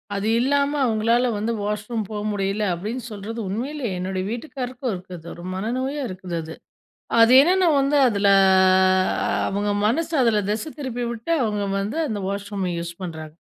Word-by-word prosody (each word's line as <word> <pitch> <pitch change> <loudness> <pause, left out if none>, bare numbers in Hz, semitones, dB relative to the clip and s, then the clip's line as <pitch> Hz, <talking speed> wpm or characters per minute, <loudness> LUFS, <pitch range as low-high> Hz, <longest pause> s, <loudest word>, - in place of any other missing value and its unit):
அது 200 +2 -2
இல்லாம, 280 +3 +2 0.2
அவங்களால 230 +2 +2
வந்து 215 +3 -1
வாஷ் 210 +1 -3
ரூம் 225 -3 -2
போ 215 - -5
முடியல, 200 +1 -1
அப்படின்னு 215 +8 -4
சொல்றது 215 +3 -6
உண்மயிலே. 255 +6 -3
என்னுடைய 185 +1 -2
வீட்டுக்காரருக்கும் 250 0 -4
இருக்குது. 180 -2 -10
ஒரு 175 - -10
மனநோயா 260 +8 -2
இருக்குது 185 -1 -6
அது. 160 +1 -8 0.7
அது 230 +1 +6
என்னன்னா 365 +4 +3
வந்து 275 +2 +2
அதில, 200 -3 +1 1.2
அவங்க 205 +1 -1 0.2
மனசு 325 +8 -1
அதில 220 -3 +3
திசை 215 +8 -3
திருப்பிவிட்டு, 240 0 -4
அவங்க 210 -2 -1 0.2
வந்து 210 +11 -3
அந்த 215 -2 -2
வாஷ்ரூம 200 -2 -3
யூஸ் 170 0 -5
பண்றாங்க! 160 -3 -7
215 Hz, 145 wpm, -23 LUFS, 195-250 Hz, 1.2 s, அது